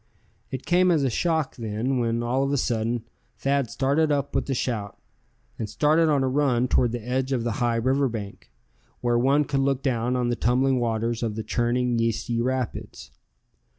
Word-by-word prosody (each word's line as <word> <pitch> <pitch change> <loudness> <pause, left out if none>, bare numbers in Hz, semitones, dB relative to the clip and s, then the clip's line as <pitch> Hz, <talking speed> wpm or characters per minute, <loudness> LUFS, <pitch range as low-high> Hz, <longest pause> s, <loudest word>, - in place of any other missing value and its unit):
It 130 - -6
came 180 +1 +3
as 160 -5 +3
a 130 - +1
shock, 160 0 0
then, 115 +3 -2
when 115 0 0
all 125 +3 0
of 135 0 0
a 140 - +1
sudden 115 -1 -1 0.3
Thad 140 -3 0
started 145 +3 +1
up 140 -1 -1
with - - -1
a 135 - 0
shout, 110 -5 -3 0.6
and 110 - -3
started 155 +8 +3
on 140 -3 +2
a - - +1
run 130 -2 +2
toward 120 -1 +2
the 120 -1 -5
edge 130 +1 -1
of 125 -3 0
the 120 - -1
high 120 -1 +2
river 130 +4 +1
bank, 105 - -7 0.5
where 120 -1 +2
one 140 +4 +3
could 135 0 -1
look 135 -1 0
down 125 -2 0
on 125 -1 0
the 120 - 0
tumbling 130 +2 +2
waters 115 0 -1
of 110 -3 -2
the 110 - -4
churning 120 +1 0
yeasty 115 +1 0
rapids. 125 - -3
125 Hz, 190 wpm, -25 LUFS, 115-135 Hz, 0.6 s, came